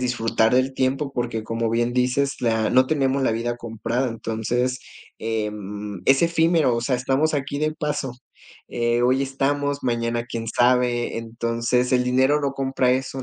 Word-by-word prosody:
disfrutar 115 -2 +1
del 130 +1 +2
tiempo, 135 +2 -1
porque, 120 -3 -3
como 115 0 -2
bien 120 +1 0
dices, 125 +3 0
la 110 -2 +1
no 130 +1 +5
tenemos 135 -2 +1
la - - +2
vida 115 +2 -2
comprada. 120 +2 -2
Entonces, 120 +3 -2 0.4
em, 105 -2 -4
es 135 +2 +4
efímero, 165 -5 +3
o 115 - -1
sea, 125 +2 0
estamos 135 +5 +1
aquí 140 0 -2
de 155 +1 0
paso, 150 -5 -3 0.6
eh, 120 0 0
hoy 130 +2 +3
estamos, 140 +1 -1
mañana 120 -1 -1
quién 115 -1 -5
sabe. 120 0 +2
Entonces, 115 +2 -1
el 125 -1 +4
dinero 130 +4 +3
no 140 -2 -1
compra 135 -2 0
eso, 130 +1 -1
125 Hz, 160 wpm, -23 LUFS, 115-135 Hz, 0.6 s, no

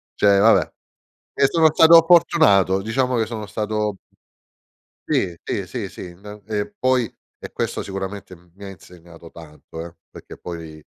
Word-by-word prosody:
cioè, 100 -1 +3
vabbè. 110 +2 +4 0.6
E 140 - +3
sono 160 -1 +3
stato 165 +1 +7
fortunato, 100 - +4
diciamo 125 +3 -1
che 110 -1 0
sono 110 -2 -6
stato 105 -1 -3 1.1
sì, 90 -3 -1
sì, - - -4
sì, - - -6
sì. 90 -1 -10
Na 105 +3 -12
e 105 - -4
poi 130 -3 0 0.3
e - - -9
questo - - -3
sicuramente 95 0 -7
mi 90 +3 -17
ha 100 - -7
insegnato 85 -2 -15
tanto, 80 0 -11
eh, 85 0 -12
perché - - -13
poi, 80 -3 -9
100 Hz, 150 wpm, -21 LUFS, 90-115 Hz, 1.1 s, stato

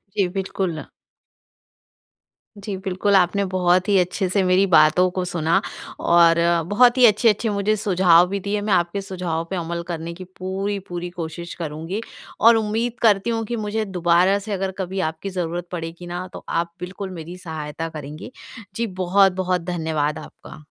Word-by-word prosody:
जी, 200 -3 +2
बिल्कुल। 185 -4 -3 1.7
जी, 200 0 -5
बिल्कुल, 190 +1 0
आपने 190 +2 +3
बहुत 185 0 +2
ही 200 - +4
अच्छे 180 +2 0
से 195 +1 +1
मेरी 185 +1 +3
बातों 170 +2 +5
को 185 0 -2
सुना। 170 -2 +1 0.4
और 170 -1 +5 0.3
बहुत 240 +5 +4
ही 250 - +7
अच्छे-अच्छे 220 0 +3
मुझे 205 +1 +1
सुझाव 180 -4 +4
भी 200 +1 -2
दिए, 205 +1 -2
मैं 205 -1 0
आपके 175 +3 +1
सुझाव 180 -4 -3
पे 195 - -3
अमल 170 -1 -3
करने 170 -1 -5
की 185 +2 -9 0.2
पूरी-पूरी 190 -2 -4
कोशिश 170 0 -6
करूँगी 165 +5 -5 0.4
और 230 +1 +7
उम्मीद 225 +3 -1
करती 210 -1 +3
हूँ 225 -1 -1
कि 240 - -3
मुझे 215 0 -2
दोबारा 180 +1 +2
से 205 +1 -5
अगर 190 0 -2
कभी 190 0 -3
आपकी 160 +5 -7
ज़रूरत 175 -1 -3
पड़ेगी 170 0 -6
ना 175 +1 -5
तो - - -9
आप 170 0 -1
बिल्कुल 190 +2 -6
मेरी 170 +3 -8
सहायता 160 -1 -6
करेंगी। 155 - -8 0.4
जी 230 +2 -1
बहुत-बहुत 185 -1 +2
धन्यवाद 160 -4 -2
आपका। 155 - -13
185 Hz, 160 wpm, -22 LUFS, 170-200 Hz, 1.7 s, ही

